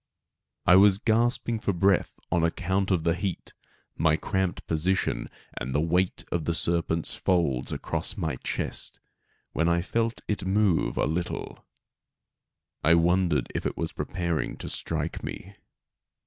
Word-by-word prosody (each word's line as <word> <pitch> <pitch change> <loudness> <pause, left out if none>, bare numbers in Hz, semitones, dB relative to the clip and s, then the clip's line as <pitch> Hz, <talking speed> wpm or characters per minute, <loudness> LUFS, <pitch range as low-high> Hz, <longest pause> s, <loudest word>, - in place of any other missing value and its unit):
I 90 - +7
was 100 0 +7
gasping 115 +1 +1
for 100 - 0
breath 95 +1 +2
on 85 -1 +2
account 95 +3 0
of 90 -4 +1
the 85 0 +2
heat, 95 0 -4 0.4
my 80 -1 +3
cramped 95 +2 -2
position 90 +4 0 0.3
and 65 +2 -3
the - - +3
weight 90 +3 0
of 85 -3 -1
the 85 - 0
serpent's 85 -1 +1
folds 80 -9 0
across - - -3
my - - -2
chest, - - -4 0.5
when 85 +1 +2
I 85 0 +2
felt 115 +3 -1
it 105 - -2
move 95 -2 +2
a - - +2
little. 85 +3 -3 1.2
I 85 +3 +6
wondered 85 -5 +2
if - - -1
it - - -5
was 85 +1 -3
preparing 85 -3 -2
to - - -6
strike - - -3
me. 100 - -7
90 Hz, 145 wpm, -27 LUFS, 85-95 Hz, 1.2 s, I